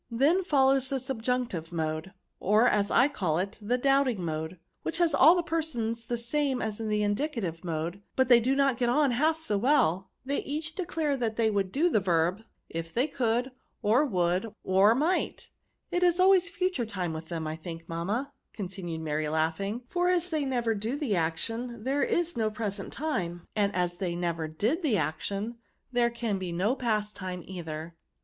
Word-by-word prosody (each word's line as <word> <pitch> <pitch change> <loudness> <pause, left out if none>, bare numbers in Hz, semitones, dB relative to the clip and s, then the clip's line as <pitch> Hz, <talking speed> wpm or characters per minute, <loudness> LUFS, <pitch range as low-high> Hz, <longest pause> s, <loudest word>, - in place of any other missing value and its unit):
^* - - -49
Then 325 +9 +4
follows 270 -5 +3
the 275 - 0
subjunctive 245 -9 -2
mode, 160 +2 -2 0.3
or, 215 +5 +4
as 205 -4 +2
I 250 - +5
call 180 - -1
it, 195 +4 -3
the 235 +4 0
doubting 260 -7 +2
mode, 160 +2 -3 0.2
which - - -2
has 340 -3 +3
all 330 - +7
the 350 - +1
persons 240 -9 -2
the 240 +1 -2
same 265 +2 0
as 220 -1 -3
the 210 -1 0
indicative 205 - -2
mode; 170 +3 -3
but 260 -1 +3
they 240 -2 +7
do 255 +4 +1
not 275 -3 +2
get 240 -1 +2
on 280 +2 +3
half 310 +7 +2
so 215 -11 0
well; 205 - +2 0.2
they 280 +2 0
each 305 +3 -3
declare 320 -5 -1
they 225 -3 0
would 195 -2 0
do 305 - +2
the 310 - +3
verb, 180 +1 +1 0.3
if 165 0 -5
they 245 +8 +2
could, 250 -2 0 0.3
or 225 +7 +4
would, 180 - +1 0.2
or 195 +4 +5
might, 315 +8 -1 0.2
— - - -22
^it 355 - +1
is 350 0 +3
always 370 -2 +5
future 345 -8 -1
time 185 -6 -3
with 160 0 -6
them, 165 -2 -4
I 155 0 -3
think, 165 0 -8
mamma," 205 +12 -2 0.2
con 195 -4 -3
tinued 175 -4 -5
Mary, 155 -1 -1
laughing; 165 +9 -1
'' - - -37
for 355 0 +2
as 360 0 +1
they 305 -3 0
never 240 -4 0
do 220 +6 -3
the 275 -9 0
action, 225 +8 -2
there 275 +3 0
is 345 0 +1
no 220 -2 +1
present 210 -2 -4
time; 175 - -3
and 205 -2 +2
as 175 -1 0
they 175 -2 -2
never 170 -2 -2
did 220 - 0
the 270 - +2
action, 200 +9 -3 0.3
there 240 -1 +3
can 230 -4 -2
be 185 -2 -4
no 190 +9 +1
past 215 -5 -1
time 185 -2 -5
either. 165 -3 -6
225 Hz, 195 wpm, -28 LUFS, 180-275 Hz, 0.3 s, all